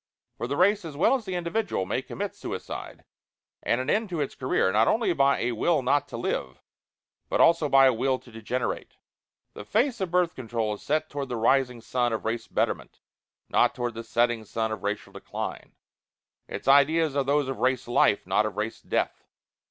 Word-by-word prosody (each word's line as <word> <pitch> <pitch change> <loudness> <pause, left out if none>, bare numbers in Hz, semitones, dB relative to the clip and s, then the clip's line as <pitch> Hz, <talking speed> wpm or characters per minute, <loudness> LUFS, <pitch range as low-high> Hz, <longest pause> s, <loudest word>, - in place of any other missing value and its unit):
For 120 - -4
the 140 +3 -2
race, 205 +2 +3
as 155 -4 -8
well 175 - +4
as 255 -5 -1
the 190 -2 -3
individual, 175 - -1
may - - -1
commit - - -5
"suicide" - - -7 0.6
and 120 - +1
an 130 - -3
end 215 +6 +1
to 170 -3 -3
its 145 - -2
career, 130 -7 +1
not 110 +3 +3
only 220 -5 +2
by 140 -2 +3
a 120 - 0
will 140 +5 +1
not 140 +3 +2
to - - -7
live 65 - -3 0.7
but - - 0
also 165 -3 +5
by 135 0 +7
a 130 - +5
will 130 +3 +1
to 125 - -17
degenerate. 115 +3 -4 0.6
The - - -8
face 230 - 0
of 190 - -1
Birth 175 0 +2
Control 115 -5 -2
is 105 - -9
set 155 +1 0
toward 140 -3 -5
the 125 - -2
rising 125 +1 +2
sun 120 0 0
of 110 - -3
Race 115 +1 -2
Betterment, - - -2 0.5
not - - +3
toward 120 -1 -2
the 115 +1 -6
setting 120 0 +1
sun 110 +1 -2
of 110 -3 -4
Racial 105 +1 -4
Decline. - - -6 0.7
Its - - -7
ideas 145 +2 +4
are 140 - +2
those 140 +1 +1
of 135 - -4
Race 130 -2 +1
Life, 120 -3 +3
not 110 - +2
of 100 -2 -8
Race 110 +2 -3
Death. - - -2
130 Hz, 200 wpm, -26 LUFS, 115-160 Hz, 0.7 s, by